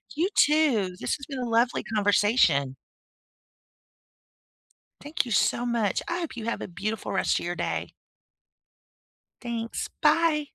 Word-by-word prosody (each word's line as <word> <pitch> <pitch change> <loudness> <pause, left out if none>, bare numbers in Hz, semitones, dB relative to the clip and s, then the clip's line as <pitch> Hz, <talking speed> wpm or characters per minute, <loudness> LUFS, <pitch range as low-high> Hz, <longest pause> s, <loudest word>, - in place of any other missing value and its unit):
You 350 +6 +1
too, 265 -12 +3
this - - -1
has 280 - -9
been 275 -3 -5
a 245 - -3
lovely 235 +2 +2
conversation. 205 - +2 2.3
Thank 290 0 -2
you 235 - -7
so 240 +2 +2
much, 230 -5 0
I 345 +1 -2
hope 325 -8 -5
you 225 - -5
have 230 - -2
a - - -5
beautiful 205 +5 -4
rest - - +1
a - - -7
your 175 +1 -3
day. - - -3 1.5
Thanks, 235 -2 -4
bye. 315 -3 +3
235 Hz, 135 wpm, -26 LUFS, 205-290 Hz, 2.3 s, too